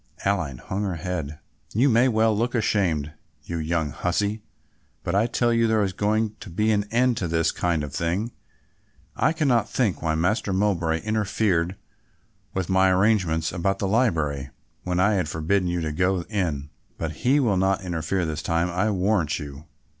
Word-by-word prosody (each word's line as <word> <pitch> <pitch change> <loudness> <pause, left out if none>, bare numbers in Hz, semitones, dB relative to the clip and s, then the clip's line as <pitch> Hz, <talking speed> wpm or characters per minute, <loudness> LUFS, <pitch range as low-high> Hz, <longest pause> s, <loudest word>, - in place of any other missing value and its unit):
Aline 90 -10 0
hung 95 +9 -4
her 95 -4 -1
head. 80 -3 -4 0.4
"You 125 +6 +4
may 120 0 +4
well 110 -2 +3
look 120 +4 -1
ashamed, 85 -10 0 0.3
you 85 - -4
young 80 -1 -1
hussie, 100 +7 -1 0.6
but 85 - -2
I 105 +4 +3
tell 120 0 +1
you 115 0 +3
there 110 -1 +2
is 95 -2 -1
going 110 +2 0
to 105 - -9
be 105 +6 +1
an 105 -1 +1
end 120 +2 +2
to 90 - -1
this 80 0 +1
kind 85 -4 0
of 70 -2 -6
thing. 90 +9 -1 0.8
I - - +2
cannot 140 -8 +1
think 105 - 0
why 80 -1 0
Master 100 +5 0
Mowbray 90 -5 +1
interfered 100 -4 0 0.8
with 95 -3 -2
my 95 0 +4
arrangements 90 -5 +2
about 95 +2 0
the 100 - -1
library, 80 - +1 0.3
when 90 0 -1
I 100 +3 +4
had 90 -6 0
forbidden 90 +5 0
you 85 0 -1
to 80 -1 -2
go 90 +3 +1
in, 80 -9 -2 0.3
but 80 -1 -4
he 135 +4 +3
will 110 -8 +2
not 95 +1 +1
interfere 85 +1 -1
this 80 0 -3
time 85 +1 0
I'll 105 +5 +1
warrant 90 -4 +1
you. 70 +1 -8
95 Hz, 175 wpm, -24 LUFS, 80-110 Hz, 0.8 s, You